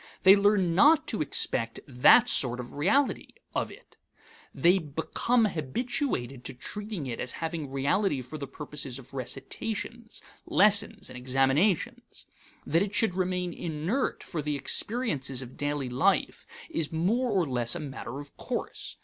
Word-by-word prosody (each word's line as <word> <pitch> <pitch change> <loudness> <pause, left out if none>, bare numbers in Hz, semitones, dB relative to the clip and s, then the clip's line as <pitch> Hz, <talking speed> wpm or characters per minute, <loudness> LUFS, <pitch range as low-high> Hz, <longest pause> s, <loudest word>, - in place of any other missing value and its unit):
They 195 0 +9
learn 200 -4 +3
not 295 - +5
to 215 - -2
expect 115 -5 0
that 125 -2 +6
sort 125 -1 +3
of 125 -1 -7
reality 210 - +1 0.2
of - - -1
it; - - -16 0.5
they 180 +3 +4
become 165 - 0
habituated 155 - -2
to 135 - -4
treating 205 - -6
it 120 -3 -4
as 125 - -2
having 160 -3 -4
reality 140 +2 0
for 140 +5 -8
the 140 - -5
purposes 140 -2 -5
of 135 0 -13
recitations, 215 - -5 0.2
lessons, 205 +1 +3
and - - -8
examinations. 135 +8 0 0.4
That 165 +4 +2
it 205 0 -2
should 220 -3 +2
remain 180 -1 -1
inert 170 - -2
for 165 - -4
the 150 0 -2
experiences 140 - -1
of 125 0 -12
daily 145 -2 -2
life 125 +1 +1 0.2
is 160 -3 -2
more 210 +11 +1
or 190 -5 +2
less 120 -2 0
a - - -3
matter 135 -3 -6
of 145 0 -11
course. - - -5
155 Hz, 150 wpm, -28 LUFS, 135-200 Hz, 0.5 s, They